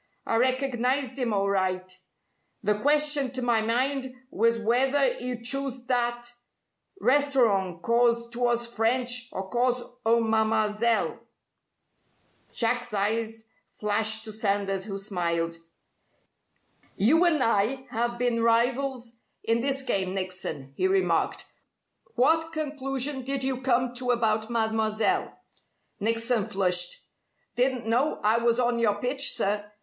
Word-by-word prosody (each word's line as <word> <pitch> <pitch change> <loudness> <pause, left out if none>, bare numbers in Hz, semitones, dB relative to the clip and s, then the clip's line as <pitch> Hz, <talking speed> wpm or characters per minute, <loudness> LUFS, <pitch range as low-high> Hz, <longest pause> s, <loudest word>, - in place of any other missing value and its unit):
I 225 - 0
recognized 255 +1 0
'im 245 -3 0
alright. 185 -2 -1 0.6
The 210 +1 +3
question 295 0 +3
to 255 -1 -3
my 235 -2 +2
mind 260 +4 0 0.2
was 230 +3 +2
w'ether 255 +4 +2
'e'd 245 -1 -5
chose 265 -1 -2
that 240 -1 0 0.7
restorong 235 - +2
'cause 235 +1 +2
'twas 240 0 +1
French 240 +1 0
or 190 0 -5
cause 245 0 +1 0.2
o' 230 +1 +3
Mam'selle." 220 0 +1 1.3
Jack's 230 -1 -1
eyes 220 +2 -1 0.3
flashed 220 +1 +1
to 220 - -8
Sanders, 200 -2 -1
who 200 -2 -5
smiled. 170 -4 -2 1.4
"You 285 - +4
and 320 -6 +3
I 230 +5 +1
have 240 +1 -1
been 240 -1 0
rivals 240 +1 0 0.3
in 230 +1 +1
this 270 +1 0
game, 195 -7 -1
Nickson," 185 -8 -5
he 375 - +1
remarked. 385 0 +1 0.7
"What 320 +5 +2
conclusion 280 -3 -2
did 270 +1 -1
you 260 -1 -1
come 250 -1 +1
to 250 0 -2
about 225 -2 +1
Mademoiselle?" 220 - 0 0.6
Nickson 230 +1 0
flushed. 180 -2 +1 0.6
"Didn't 250 -1 0
know 245 +7 +1
I 220 +2 +3
was 235 +1 +1
on 240 -1 +1
your 215 -3 +2
pitch, 260 +6 0
sir. 205 +1 -2
235 Hz, 120 wpm, -26 LUFS, 215-255 Hz, 1.4 s, You